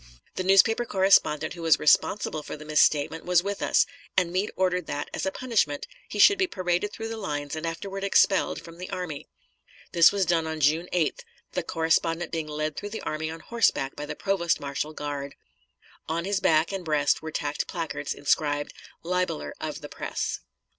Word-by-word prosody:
The 185 - -3
newspaper 195 +5 +5
correspondent 190 -7 +3
who 170 - -9
was 165 -1 +5
responsible 155 +1 +2
for 150 - -7
the 155 - -11
misstatement 155 +1 +2
was 180 -1 +3
with 200 0 -3
us, - - +3 0.3
and 180 -2 +3
Meade 190 +4 0
ordered 180 -2 0
that, 145 - -4
as - - -2
a - - 0
punishment, 210 - 0 0.2
he - - -5
should 400 - +7
be 380 - +3
paraded 185 - -1
through 225 +1 -6
the 225 - -5
lines 145 -7 -4
and 160 +1 -3
afterward 195 +4 -5
expelled 195 -1 +3
from 170 +1 -12
the 180 - -6
army. 175 -6 -5 0.6
This 170 -1 +7
was 200 -2 +1
done 165 -2 +1
on 160 0 -4
June 155 +4 +2
8th, 170 -4 0 0.3
the 180 - -1
correspondent 165 +1 0
being 160 -2 -3
led 155 0 -3
through 205 - -5
the 220 - -6
army 155 +1 -3
on 165 0 -7
horseback 230 -13 +1
by 150 - -6
the 150 - -5
provost 190 -3 0
marshal 145 +2 -4
guard. 145 -2 -5 0.7
On 165 +2 -1
his 200 0 0
back 160 -1 +3
and 195 -2 -4
breast 150 -3 +1
were 160 - -5
tacked 145 -1 -3
placards 165 -4 -4
inscribed, 145 0 0 0.3
"Libeller 175 - -2
of - - -4
the - - -8
Press." - - -3
165 Hz, 190 wpm, -26 LUFS, 155-190 Hz, 0.7 s, should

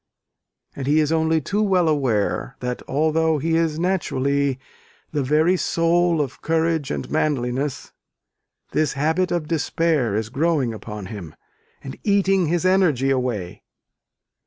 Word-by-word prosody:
And 135 -1 -5
he 150 +2 +4
is 155 0 +1
only 160 0 +2
too 205 +8 -1
well 185 -5 +2
aware, 130 -4 0
that 125 0 -4
although 160 +2 +1
he 160 +3 0
is 165 -2 +1
naturally 140 -6 0 0.5
"the 150 - -1
very 155 +7 +3
soul 170 -1 +2
of 135 -3 -5
courage 160 -2 0
and - - -3
manliness," 140 -2 -1 0.8
this 155 -2 +1
habit 160 +6 0
of 170 -3 -1
despair 155 -7 0
is 110 +1 -2
growing 140 -3 0
upon 105 -2 -7
him, 90 -6 -8 0.5
and 135 - -8
eating 195 -3 +2
his 175 +3 0
energy 165 -9 +3
away. 120 -9 -2
155 Hz, 135 wpm, -22 LUFS, 130-165 Hz, 0.8 s, he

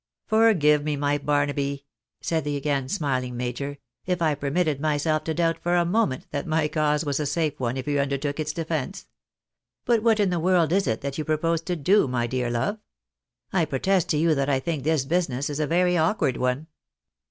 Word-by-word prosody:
" - - -65
Forgive 185 -10 +4
me, 150 -1 -1
my 145 +1 0
Barnaby," 140 -1 -1 0.4
said 160 -1 -1
the 145 -1 -2
again 140 -2 -1
smiling 130 -8 -1
major, 125 +4 -4
" 120 - -53
if 180 -1 0
I 160 -3 +2
permitted 145 +1 -1
myself 155 0 0
to 160 - -1
doubt 165 -1 +1
for 175 +1 +1
a 175 -1 +3
moment 175 - 0
that 145 - -3
my 155 -1 +1
cause 150 0 0
was 145 -1 -1
a 150 - -1
safe 155 0 -1
one, 125 0 -1
if 130 - -5
you 145 -1 +1
undertook 140 +1 -1
its 155 0 -1
defence. 165 +3 -4 0.8
But 235 -3 +3
what 225 -1 +3
in 200 -3 +2
the 175 - 0
world 170 -2 +2
is 195 +1 +2
it 110 -2 -1
that 140 +1 -4
you - - -1
propose 160 +2 0
to 175 +2 -3
do, 175 +3 +3
my 125 -2 -1
dear 125 0 -2
love? 135 - -1 0.7
I 185 - +3
protest 170 +6 0
to 150 - +2
you 160 +1 +3
that 140 -1 0
I 135 -2 +2
think 150 -1 -3
this 155 -3 +1
business 145 -4 -1
is 145 - -4
a 150 - 0
very 180 +2 +2
awkward 160 - +1
one." 125 +4 -1
150 Hz, 210 wpm, -25 LUFS, 140-170 Hz, 0.8 s, Forgive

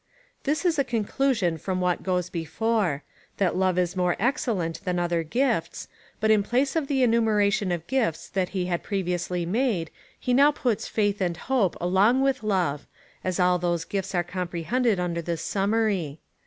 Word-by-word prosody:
This 300 +5 0
is 330 -4 +2
a - - +4
con 230 -5 -1
clusion 210 -12 0
from 185 +3 -2
what 180 -1 0
goes 180 -1 -1
before 175 -2 -1 0.2
— - - -33
that 190 -3 +1
love 185 -1 +1
is 180 0 0
more 180 -1 +1
excellent 220 - -1
than 180 -1 -1
other 175 -1 0
gifts; 250 - -1 0.3
but 220 0 +3
in 215 -1 +5
j^lace 255 +8 0
of 315 -4 0
the 270 -2 +1
enumeration 210 -4 +2
of 170 -2 -2
gifts 230 -11 -1
that 185 -2 -1
he 185 -2 -2
had 175 -1 -1
previously 180 -3 -2
made, 200 -3 0 0.3
he 250 - 0
now 280 +3 +6
puts 245 -7 -1
faith 205 -2 0
and 175 -2 0
hojje 235 -5 +1
■ - - -15
along 195 +9 +3
with 270 -2 +1
love, 180 -9 -1 0.4
as 185 -1 -2
all 180 0 +3
those 175 -2 -1
gifts 195 +1 -3
are 175 - +2
comprehended 180 +6 -1
under 170 -1 -1
this 170 -1 -3
summary. 195 -7 0
190 Hz, 180 wpm, -26 LUFS, 175-230 Hz, 0.4 s, now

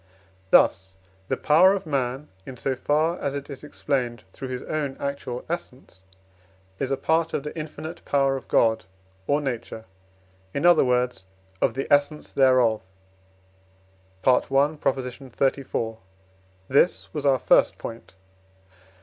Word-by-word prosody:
Thus 95 +1 +4 0.3
the - - -1
power 180 +6 +5
of 195 - -5
man, 135 -1 -2
in 125 +5 -9
so 130 +3 -1
far 155 +6 +1
as 140 -1 -2
it 140 +1 -6
is 135 0 -9
explained 125 -6 -2
through 135 - -7
his 125 -1 -5
own 145 -3 -3
actual 140 -3 -4
essence, 130 - -7 0.8
is 135 - -1
a 135 - 0
part 160 +4 +1
of 140 - -2
the 150 - -6
infinite 160 +1 -7
power 135 -1 +2
of 135 - -7
God 110 -4 +2 0.4
or 145 - +2
Nature, 120 -4 -5 0.7
in 140 - 0
other 175 -2 +6
words, 125 -6 0 0.3
of 120 - +2
the 135 - -2
essence 145 +1 +1
thereof 130 -5 +4 1.4
(I. 130 - +7
xxxiv.). 135 -4 -1 0.7
This 145 +6 +2
was 150 -3 -3
our 135 -1 +4
first - - +3
point. 115 -4 -9
135 Hz, 130 wpm, -25 LUFS, 125-150 Hz, 1.4 s, I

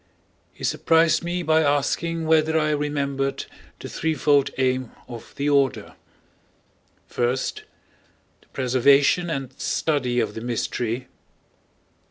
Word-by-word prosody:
He - - -14
surprised 165 0 +2
me 175 +1 -2
by 160 0 +3
asking 160 +3 0
whether 160 0 +3
I 155 0 +1
remembered 140 -2 -2 0.3
the - - -7
threefold 145 -3 +1
aim 130 -2 0 0.2
of 120 -2 -10
the 140 - -2
order: 140 -2 +1 1.2
(1) 120 +1 +1
The 130 - -10
preservation 140 +6 +3
and 135 -5 -4
study 130 -6 0
of - - -1
the 110 - -7
mystery. 120 +1 -3
140 Hz, 110 wpm, -23 LUFS, 130-160 Hz, 1.2 s, by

